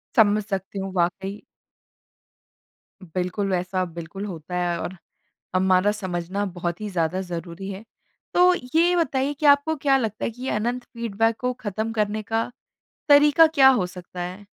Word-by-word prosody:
समझ 215 Hz, -3 st, +4 dB
सकती 195 Hz, -1 st, -4 dB
हूँ, 195 Hz, 0 st, -4 dB
वाक़ई। 190 Hz, +3 st, -1 dB, 1.6 s
बिल्कुल, 180 Hz, +3 st, -2 dB
वैसा 185 Hz, +1 st, 0 dB
बिल्कुल 170 Hz, +4 st, -7 dB
होता 180 Hz, -2 st, -7 dB
है 175 Hz, -1 st, 0 dB
और 185 Hz, -, -5 dB, 0.6 s
हमारा 185 Hz, +2 st, +3 dB
समझना 190 Hz, -1 st, -3 dB
बहुत 175 Hz, -1 st, -4 dB
ही 210 Hz, -, -3 dB
ज़्यादा 180 Hz, 0 st, -1 dB
ज़रूरी 175 Hz, +1 st, -6 dB
है। 195 Hz, +3 st, -8 dB, 0.5 s
तो 360 Hz, +1 st, +6 dB, 0.2 s
ये 345 Hz, +2 st, +4 dB
बताइए 280 Hz, -4 st, +1 dB
कि 300 Hz, +2 st, -4 dB
आपको 285 Hz, +2 st, +5 dB
क्या 275 Hz, -2 st, +3 dB
लगता 220 Hz, -4 st, -2 dB
है -, -, -2 dB
कि 245 Hz, +3 st, -14 dB
ये 265 Hz, -, -2 dB
अनंत 240 Hz, +4 st, -1 dB
फीडबैक 225 Hz, -2 st, -1 dB
को 250 Hz, 0 st, -1 dB
ख़त्म 220 Hz, +2 st, -3 dB
करने 215 Hz, 0 st, -1 dB
का 225 Hz, +3 st, -1 dB, 0.6 s
तरीका 295 Hz, +3 st, +7 dB
क्या 275 Hz, -4 st, +6 dB
हो 245 Hz, -9 st, +3 dB
सकता 180 Hz, 0 st, -9 dB
है? 185 Hz, +3 st, -6 dB
205 Hz, 155 wpm, -24 LUFS, 180-245 Hz, 1.6 s, तरीका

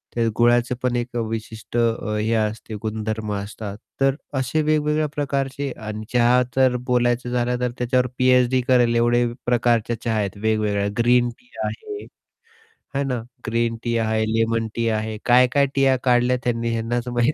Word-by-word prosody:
ते 115 Hz, -1 st, +1 dB
गुळाचे 120 Hz, +1 st, +3 dB
पण 125 Hz, -1 st, +1 dB
एक 120 Hz, 0 st, -3 dB
विशिष्ट 110 Hz, +1 st, -5 dB
अ, 115 Hz, -2 st, 0 dB
हे 110 Hz, +2 st, 0 dB
असते 110 Hz, 0 st, -2 dB
गुणधर्म 110 Hz, -1 st, -3 dB
असतात. 100 Hz, 0 st, -6 dB, 0.2 s
तर 135 Hz, 0 st, +3 dB, 0.2 s
असे 135 Hz, +5 st, 0 dB
वेगवेगळ्या 150 Hz, 0 st, +1 dB
प्रकारचे 140 Hz, -1 st, -2 dB, 0.2 s
अन 110 Hz, 0 st, -5 dB
चहा 125 Hz, +1 st, +4 dB
तर 130 Hz, -2 st, +4 dB
बोलायचं 120 Hz, 0 st, +1 dB
झालं 125 Hz, 0 st, 0 dB
तर 125 Hz, -1 st, 0 dB
त्याच्यावर 125 Hz, +1 st, +1 dB
पी-एच-डी 125 Hz, 0 st, +4 dB
करेल 120 Hz, -2 st, +4 dB
एवढे 120 Hz, +1 st, +3 dB, 0.2 s
प्रकारच्या 120 Hz, -2 st, +1 dB
चहा 115 Hz, -2 st, 0 dB
आहेत 100 Hz, -1 st, -2 dB
वेगवेगळ्या 105 Hz, -1 st, 0 dB
ग्रीन 120 Hz, 0 st, +4 dB
टी 245 Hz, -, -27 dB
आहे. 420 Hz, -2 st, -5 dB, 0.9 s
है 140 Hz, -, +1 dB
ना? 125 Hz, -4 st, -2 dB, 0.3 s
ग्रीन 115 Hz, 0 st, 0 dB
टी 120 Hz, -1 st, 0 dB
आहे, 110 Hz, -1 st, +1 dB
लेमन 115 Hz, 0 st, +1 dB
टी 115 Hz, 0 st, 0 dB
आहे, 110 Hz, 0 st, -2 dB
काय-काय 125 Hz, +3 st, +5 dB
टीया 135 Hz, -1 st, +4 dB
काढल्या 125 Hz, 0 st, +3 dB
त्यांनी 115 Hz, -1 st, -1 dB
ह्यांनाच 120 Hz, +2 st, -2 dB
माहीत. 120 Hz, +4 st, +1 dB
120 Hz, 155 wpm, -22 LUFS, 115-125 Hz, 0.9 s, काय-काय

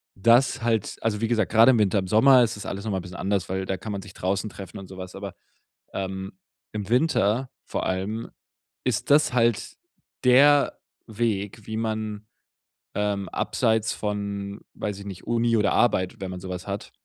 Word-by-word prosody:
das 115 Hz, +6 st, +4 dB
halt 115 Hz, -3 st, 0 dB
also 110 Hz, -2 st, 0 dB
wie 115 Hz, -, +1 dB
gesagt, 110 Hz, -4 st, +1 dB
grade 115 Hz, +3 st, +7 dB
im 120 Hz, -, +3 dB
Winter, 100 Hz, -1 st, +3 dB
im 95 Hz, -, -4 dB
Sommer 125 Hz, +6 st, +6 dB
ist 115 Hz, 0 st, -1 dB
das 105 Hz, -, -8 dB
alles 100 Hz, +2 st, -5 dB
noch 110 Hz, -, -1 dB
mal 95 Hz, -, 0 dB
'n -, -, -6 dB
bisschen 90 Hz, +1 st, -9 dB
anderes, 100 Hz, -2 st, -1 dB
weil 95 Hz, 0 st, -2 dB
da 95 Hz, -, -1 dB
kann 105 Hz, +4 st, -6 dB
man 100 Hz, -, -4 dB
sich 100 Hz, -, -12 dB
draußen 100 Hz, +3 st, -1 dB
treffen 95 Hz, -3 st, -9 dB
und 95 Hz, -, -10 dB
so 95 Hz, -, -10 dB
was, 90 Hz, -1 st, -7 dB
aber, 100 Hz, -1 st, -7 dB, 0.6 s
ähm, 95 Hz, 0 st, -4 dB, 0.4 s
im 105 Hz, -2 st, -4 dB
Winter 125 Hz, -2 st, +2 dB, 0.2 s
vor -, -, -3 dB
allem 100 Hz, +5 st, -2 dB, 0.6 s
ist -, -, 0 dB
das 150 Hz, -3 st, +5 dB
halt 115 Hz, -3 st, +1 dB, 0.5 s
der 140 Hz, +3 st, +6 dB, 0.3 s
Weg, 110 Hz, -2 st, -2 dB
wie 110 Hz, -, -3 dB
man, 110 Hz, -1 st, -3 dB, 0.7 s
ähm, 100 Hz, -2 st, -1 dB
abseits 110 Hz, -1 st, 0 dB
von, 100 Hz, -1 st, -4 dB
weiß 105 Hz, -2 st, -3 dB
ich 100 Hz, -, -9 dB
nicht, 95 Hz, -2 st, -8 dB
Uni 115 Hz, 0 st, +2 dB
oder 105 Hz, -, +2 dB
Arbeit, 95 Hz, -6 st, +2 dB
wenn 95 Hz, -1 st, -4 dB
man 90 Hz, -, -6 dB
so 95 Hz, -, -7 dB
was 90 Hz, 0 st, -5 dB
hat 100 Hz, +1 st, -5 dB
105 Hz, 195 wpm, -25 LUFS, 95-115 Hz, 0.7 s, grade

